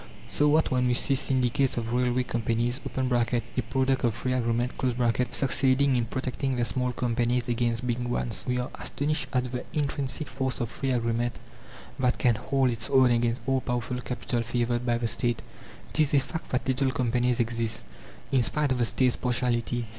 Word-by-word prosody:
So 145 Hz, 0 st, +2 dB
that, 160 Hz, -, +2 dB
when 125 Hz, -1 st, +2 dB
we 125 Hz, -, +2 dB
see 135 Hz, -, +2 dB
syndicates 130 Hz, -1 st, +1 dB
of 115 Hz, 0 st, -2 dB
railway 125 Hz, 0 st, +2 dB
companies 120 Hz, +1 st, -1 dB
(a -, -, -4 dB, 0.7 s
product 130 Hz, +3 st, 0 dB
of 115 Hz, -3 st, +2 dB
free 125 Hz, +2 st, -2 dB
agreement) 120 Hz, 0 st, 0 dB, 0.6 s
succeeding 135 Hz, 0 st, +2 dB
in 120 Hz, -2 st, +1 dB
protecting 130 Hz, +2 st, -2 dB
their 120 Hz, -1 st, +1 dB
small 125 Hz, +1 st, -1 dB
companies 120 Hz, 0 st, 0 dB
against 120 Hz, 0 st, 0 dB
big 120 Hz, -1 st, -1 dB
ones, 120 Hz, -2 st, -2 dB
we 125 Hz, 0 st, +1 dB
are 125 Hz, +1 st, -3 dB
astonished 145 Hz, -1 st, -2 dB
at 125 Hz, -2 st, 0 dB
the 125 Hz, -, -3 dB
intrinsic 140 Hz, -2 st, -2 dB
force 130 Hz, -1 st, -3 dB
of 120 Hz, -2 st, -2 dB
free 135 Hz, -, -3 dB
agreement 120 Hz, -1 st, 0 dB, 0.6 s
that 125 Hz, -1 st, +2 dB
can 120 Hz, -, +3 dB
hold 130 Hz, +3 st, +1 dB
its 115 Hz, -1 st, -2 dB
own 130 Hz, -2 st, +5 dB
against 120 Hz, +1 st, +1 dB
all 135 Hz, -1 st, +1 dB
powerful 125 Hz, 0 st, -2 dB
Capital 125 Hz, -1 st, -2 dB
favoured 120 Hz, +1 st, -1 dB
by 120 Hz, 0 st, +2 dB
the 120 Hz, 0 st, -1 dB
State. 120 Hz, 0 st, 0 dB, 0.5 s
It -, -, -2 dB
is 150 Hz, -2 st, +3 dB
a -, -, +6 dB
fact 160 Hz, +5 st, -6 dB
that 125 Hz, -, -1 dB
little 130 Hz, +1 st, +2 dB
companies 125 Hz, -1 st, +1 dB
exist, 115 Hz, -1 st, -1 dB, 0.5 s
in 135 Hz, -2 st, +4 dB
spite 145 Hz, +3 st, +1 dB
of 130 Hz, -, +1 dB
the 120 Hz, -, +3 dB
State's 125 Hz, +2 st, +2 dB
partiality. 120 Hz, -1 st, 0 dB
125 Hz, 180 wpm, -27 LUFS, 120-130 Hz, 0.7 s, a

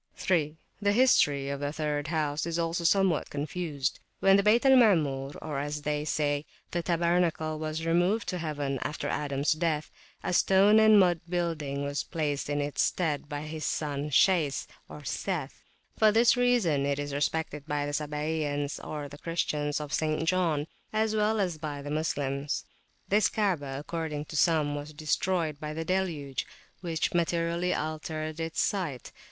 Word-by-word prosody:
3. 160 Hz, -4 st, 0 dB, 0.2 s
The 205 Hz, 0 st, +3 dB
history 145 Hz, -, +4 dB
of 140 Hz, 0 st, -3 dB
the 145 Hz, 0 st, -2 dB
third 150 Hz, -1 st, -2 dB
house 155 Hz, -1 st, -1 dB
is 165 Hz, 0 st, -2 dB
also 170 Hz, +1 st, -1 dB
somewhat 180 Hz, -1 st, +3 dB
[p.321] -, -, -19 dB
confused. 150 Hz, -1 st, -3 dB, 0.2 s
When 195 Hz, 0 st, +5 dB
the 200 Hz, -, +5 dB
Bayt 215 Hz, +5 st, +4 dB
al 270 Hz, -, +7 dB
Maamur, 150 Hz, -, +4 dB
or, 150 Hz, -3 st, -3 dB
as 145 Hz, +1 st, -3 dB
others 150 Hz, +1 st, -2 dB
say, 145 Hz, -1 st, 0 dB, 0.3 s
the 175 Hz, -, -1 dB
tabernacle, 170 Hz, -2 st, +1 dB
was 155 Hz, +1 st, -3 dB
removed 175 Hz, +6 st, +2 dB
to 180 Hz, -, -2 dB
heaven 145 Hz, -4 st, -2 dB
after 150 Hz, -, -3 dB
Adams 140 Hz, 0 st, 0 dB
death, 155 Hz, -1 st, 0 dB, 0.3 s
a -, -, -1 dB
stone 195 Hz, +4 st, +5 dB
and 215 Hz, -1 st, +7 dB
mud 175 Hz, -3 st, +3 dB
building 160 Hz, -6 st, -2 dB
was 140 Hz, 0 st, -1 dB
placed 150 Hz, -4 st, -2 dB
in 145 Hz, 0 st, 0 dB
its 145 Hz, 0 st, -1 dB
stead 150 Hz, -5 st, 0 dB
by 145 Hz, -1 st, -4 dB
his 155 Hz, 0 st, -6 dB
son 145 Hz, -1 st, -2 dB
Shays 155 Hz, -2 st, +3 dB, 0.4 s
(Seth). 150 Hz, +1 st, -3 dB, 0.4 s
For 215 Hz, -1 st, +6 dB
this 230 Hz, +3 st, +5 dB
reason 240 Hz, -, +2 dB
it 140 Hz, 0 st, 0 dB
is 145 Hz, -1 st, -4 dB
respected 150 Hz, 0 st, -2 dB
by 145 Hz, -1 st, -1 dB
the 145 Hz, -, -4 dB
Sabaeans, 150 Hz, -1 st, -2 dB
or 150 Hz, -2 st, -5 dB
Christians 150 Hz, -1 st, -2 dB
of 150 Hz, -1 st, -6 dB
St. 155 Hz, +1 st, 0 dB
John, 165 Hz, -5 st, +1 dB, 0.3 s
as 220 Hz, 0 st, +1 dB
well 215 Hz, +1 st, +2 dB
as 180 Hz, -5 st, -1 dB
by 145 Hz, -2 st, -5 dB
the 145 Hz, -, -5 dB
Moslems. 145 Hz, -2 st, -2 dB, 0.4 s
This 205 Hz, 0 st, +3 dB
Kaabah, 165 Hz, -11 st, -1 dB
according 150 Hz, 0 st, -4 dB
to 155 Hz, -, -9 dB
some, 155 Hz, -2 st, +3 dB
was 145 Hz, +1 st, -6 dB
destroyed 155 Hz, 0 st, -1 dB
by 150 Hz, -1 st, -5 dB
the 160 Hz, 0 st, -3 dB
deluge, 165 Hz, -8 st, -2 dB, 0.3 s
which 170 Hz, +1 st, -2 dB
materially 170 Hz, +1 st, 0 dB
altered 155 Hz, 0 st, -3 dB
its 165 Hz, 0 st, -3 dB
site. 165 Hz, -, -2 dB
155 Hz, 165 wpm, -29 LUFS, 145-175 Hz, 0.4 s, al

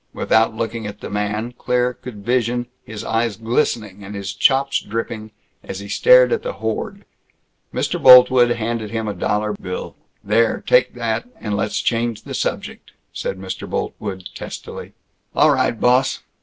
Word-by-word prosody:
Without 110 Hz, 0 st, +2 dB
looking 115 Hz, -1 st, -3 dB
at 105 Hz, -, -8 dB
the -, -, -7 dB
man, 105 Hz, +3 st, -2 dB
Claire 125 Hz, 0 st, +1 dB
could 105 Hz, -5 st, -10 dB
vision 120 Hz, 0 st, +1 dB, 0.2 s
his 110 Hz, -2 st, -8 dB
eyes 115 Hz, -1 st, -1 dB
glistening 110 Hz, -4 st, -1 dB
and 100 Hz, +1 st, -8 dB
his 100 Hz, -1 st, -4 dB
chops 135 Hz, 0 st, +2 dB
dripping 110 Hz, 0 st, -5 dB, 0.3 s
as 95 Hz, -, -6 dB
he 100 Hz, -, -8 dB
stared -, -, +5 dB
at 465 Hz, -, 0 dB
the -, -, -4 dB
hoard. -, -, -4 dB, 0.7 s
Mr. 175 Hz, -, -2 dB
Boltwood 125 Hz, -1 st, +8 dB
handed 115 Hz, -2 st, -2 dB
him 110 Hz, 0 st, -3 dB
a 105 Hz, -, -2 dB
dollar 105 Hz, +3 st, -1 dB
bill. 90 Hz, -2 st, -6 dB, 0.3 s
"There, 115 Hz, +3 st, +2 dB
take 125 Hz, 0 st, +3 dB
that, 115 Hz, -, -2 dB
and 105 Hz, -2 st, -3 dB
let's 105 Hz, +1 st, -1 dB
change 115 Hz, -1 st, -1 dB
the -, -, -7 dB
subject," -, -, -4 dB, 0.2 s
said 95 Hz, -, -4 dB
Mr. 95 Hz, 0 st, -6 dB
Boltwood 95 Hz, -3 st, -4 dB
testily. -, -, -8 dB, 0.4 s
"All -, -, +5 dB
right, 115 Hz, -, +1 dB
boss. 125 Hz, +2 st, +2 dB
115 Hz, 155 wpm, -20 LUFS, 105-125 Hz, 0.7 s, Boltwood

